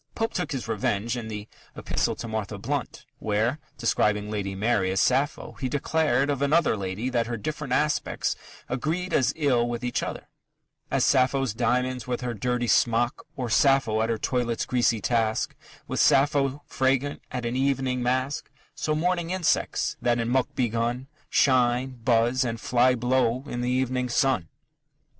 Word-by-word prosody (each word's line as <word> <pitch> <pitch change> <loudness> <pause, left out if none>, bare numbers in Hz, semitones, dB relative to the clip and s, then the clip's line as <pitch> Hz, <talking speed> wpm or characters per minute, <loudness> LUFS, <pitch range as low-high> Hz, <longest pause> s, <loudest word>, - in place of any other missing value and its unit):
Pope 225 0 -1
took 180 -3 -2
his 130 -5 -3
revenge 110 +1 -1
in 120 -2 -5
the 105 -1 -6 0.3
Epistle - - -1
to 115 - -6
Martha 110 -2 -3
Blount, 130 +5 -4
where, 110 +7 0 0.2
describing 105 0 +1
Lady 100 -2 -3
Mary 100 -2 +1
as 95 0 0
Sappho, 135 +4 +1
he 130 - -1
declared 145 -1 +1
of 140 -1 -2
another 150 -1 +3
lady 100 +4 -3
that 120 -2 +1
her 120 -1 -3
different 150 +3 -5
aspects 150 +3 0 0.3
agreed 160 +9 -2
as 130 0 +3
ill 125 -6 +2
with 120 0 -4
each 125 - -1
other - - -5 0.6
As - - +2
Sappho's 135 -2 +2
diamonds 125 +1 0
with 125 0 -2
her 125 -1 -2
dirty 120 +3 -1
smock; 120 +1 +2
Or 125 -2 -3
Sappho 115 0 +3
at 115 - 0
her 115 - 0
toilet's 120 0 -1
greasy 120 -3 +1
task 110 -2 0 0.3
With - - -2
Sappho 140 0 +3
fragrant 135 +2 0
at 125 -2 -3
an 120 +1 -2
evening 130 -1 0
mask; 130 +3 -1 0.2
So 155 - -1
morning 175 +1 0
insects, 185 -2 0
that 120 -1 +2
in 115 0 -1
muck 130 +3 0
begun, 120 +1 -1 0.2
Shine, 125 -1 +2
buzz, 120 +2 +3
and 115 -2 -3
fly 125 +2 +3
blow 125 0 +1
in 120 -4 -4
the 125 - -1
evening 125 0 0
sun. 120 -9 +1
125 Hz, 160 wpm, -26 LUFS, 115-135 Hz, 0.6 s, another